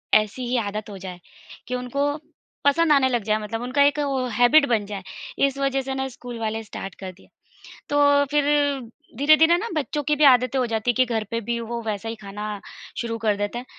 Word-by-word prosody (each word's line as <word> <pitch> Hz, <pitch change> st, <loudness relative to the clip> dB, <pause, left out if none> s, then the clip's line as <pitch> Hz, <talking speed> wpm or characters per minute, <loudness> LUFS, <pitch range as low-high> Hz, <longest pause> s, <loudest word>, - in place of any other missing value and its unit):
ऐसी 215 Hz, +4 st, +1 dB
ही 245 Hz, +1 st, 0 dB
आदत 210 Hz, -1 st, -3 dB
हो 200 Hz, -, -8 dB
जाए 185 Hz, -2 st, -8 dB, 0.5 s
कि 250 Hz, -, -2 dB
उनको 280 Hz, +4 st, -1 dB, 0.5 s
पसंद 315 Hz, +3 st, +4 dB
आने 275 Hz, -3 st, +5 dB
लग 240 Hz, -4 st, 0 dB
जाये 215 Hz, 0 st, +1 dB
मतलब 225 Hz, +2 st, -4 dB
उनका 255 Hz, +4 st, 0 dB
एक 285 Hz, +1 st, +2 dB
वो 275 Hz, -3 st, 0 dB
एक 240 Hz, -, -6 dB
हैबिट 245 Hz, +7 st, +5 dB
बन 220 Hz, -4 st, +1 dB
जाये, 200 Hz, -2 st, -6 dB, 0.4 s
इस 275 Hz, 0 st, -6 dB
वज़ह 275 Hz, -1 st, 0 dB
से 265 Hz, 0 st, -4 dB
ना 265 Hz, 0 st, -2 dB
स्कूल 245 Hz, -1 st, -9 dB
वाले 225 Hz, 0 st, -3 dB
स्टार्ट 195 Hz, -2 st, -8 dB
कर 190 Hz, -1 st, -6 dB
दिए। 185 Hz, -, -21 dB, 0.6 s
तो 285 Hz, 0 st, +4 dB
फिर 295 Hz, -1 st, +2 dB, 0.7 s
धीरे-धीरे 310 Hz, +4 st, +5 dB
ना 455 Hz, +5 st, -4 dB
बच्चों 295 Hz, 0 st, -2 dB
की 300 Hz, +1 st, +1 dB
भी 300 Hz, -, +1 dB
आदतें 255 Hz, -1 st, +5 dB
हो 250 Hz, -, +2 dB
जाती 225 Hz, +1 st, 0 dB
है -, -, -6 dB
कि 255 Hz, +3 st, +3 dB
घर 220 Hz, -, 0 dB
पे 230 Hz, -, -1 dB
भी 235 Hz, +2 st, -2 dB
वो 235 Hz, +1 st, -4 dB
वैसा 220 Hz, 0 st, -3 dB
ही 230 Hz, -, -4 dB
खाना 205 Hz, +1 st, -6 dB, 0.4 s
शुरू 230 Hz, -1 st, -3 dB
कर 210 Hz, -1 st, +3 dB
देते 205 Hz, +3 st, -3 dB
हैं। 250 Hz, -, -6 dB
245 Hz, 220 wpm, -23 LUFS, 215-280 Hz, 0.7 s, आने